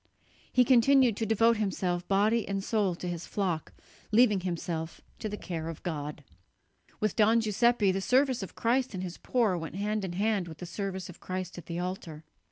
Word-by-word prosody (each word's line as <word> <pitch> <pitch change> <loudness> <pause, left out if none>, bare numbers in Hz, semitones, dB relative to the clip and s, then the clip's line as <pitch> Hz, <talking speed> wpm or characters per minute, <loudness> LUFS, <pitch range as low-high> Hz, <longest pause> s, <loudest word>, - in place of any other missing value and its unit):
He 250 -1 +4
continued 255 -1 +5
to 225 - -1
devote 225 +1 +4
himself 180 -4 -1
body 210 +3 +2
and 195 0 -2
soul 205 -5 +1
to 180 - -6
his 175 -1 -4
flock, 180 -6 -2 0.4
leaving 215 -3 +5
himself 170 -2 -4 0.2
to 215 - -3
the 210 - -5
care 165 -4 -5
of 165 - -8
God. 150 -4 -4 0.8
With 215 -2 0
Don 220 +2 +5
Giuseppe 225 -1 +3
the 195 +1 -1
service 260 +3 +2
of 195 - -7
Christ 245 -1 +1
in 185 - -3
His 180 -2 -6
poor 230 -7 +1
went 165 0 -6
hand 210 +1 -1
in 185 -2 -3
hand 200 -1 0
with 160 -2 -9
the 180 - -7
service 190 0 -4
of 180 - -12
Christ 185 -1 -5
at - - -13
the 170 - -4
altar. 175 -3 -5
195 Hz, 190 wpm, -29 LUFS, 175-225 Hz, 0.8 s, continued